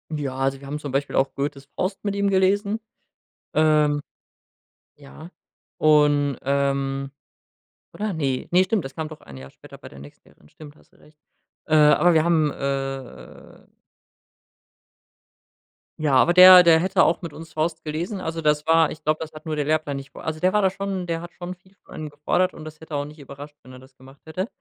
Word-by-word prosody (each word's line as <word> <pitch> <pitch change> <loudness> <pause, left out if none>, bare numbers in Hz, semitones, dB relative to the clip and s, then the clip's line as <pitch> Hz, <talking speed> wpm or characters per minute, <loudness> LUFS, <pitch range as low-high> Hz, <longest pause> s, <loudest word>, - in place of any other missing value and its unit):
Ja, 135 -3 -4
also, 135 0 -1
wir 140 - -13
haben 150 +2 -5
zum 145 -3 -7
Beispiel 140 +1 -2
auch 135 0 +1
Goethes 140 0 -4
„Faust“ 190 +2 -3
mit 200 -1 -2
ihm 200 0 +1
gelesen, 200 +3 +1 0.8
ähm 150 -1 +3 1.0
ja, 150 +4 -13 0.5
und, 145 -2 +3
ähm 140 0 -1 0.8
oder 210 -2 -4
ne, 135 -5 -2
ne 180 +1 +5
stimmt, 190 -4 -1
das 135 - -8
kam 160 -1 -4
doch 155 -1 -12
1 70 -3 -13
Jahr 65 +1 -11
später - - -15
bei - - -12
der 70 - -15
nächsten 70 +1 -15
Lehrerin, 75 - -24
stimmt, 150 -1 -14
hast - - -25
du - - -25
recht. 150 0 -23 0.5
Äh, 155 - +1
aber 155 +3 +5
wir 160 -1 +3
haben, 160 -4 +2
äh 135 -2 -6 2.3
Ja, 145 -3 +1
aber 170 +6 +4
der 185 0 +10
der 165 -1 +5
hätte 190 +2 +2
auch 170 - +1
mit 165 -4 -7
uns 160 0 -11
„Faust“ 160 +1 -2
gelesen, 170 +6 -4
also, 165 -1 -4
das 150 -1 +1
war 165 -1 +4
ich 155 0 -10
glaube, 155 +1 +1
das 160 0 -7
hat 155 +2 -12
nur 155 -1 -3
der 145 - -1
Lehrplan 155 -2 -1
nicht 135 +1 -10
vor - - -12
also, 155 0 -4
der 185 +3 +1
war 210 - +3
da 190 - +3
schon 195 -2 -5
der 165 -1 -2
hat 175 +1 -10
schon 180 +1 -7
viel 185 +2 -27
von - - -16
einem 155 -1 -6
gefordert 150 +5 -1
und 155 - -11
das 155 0 -11
hätte 160 -2 -8
auch 145 - -1
nicht 150 +1 -12
überrascht, 145 +2 -11
wenn 130 +1 -14
er 130 - -12
das 130 0 -19
gemacht 135 +1 -17
hätte. 185 +6 -4
155 Hz, 205 wpm, -23 LUFS, 140-175 Hz, 2.3 s, der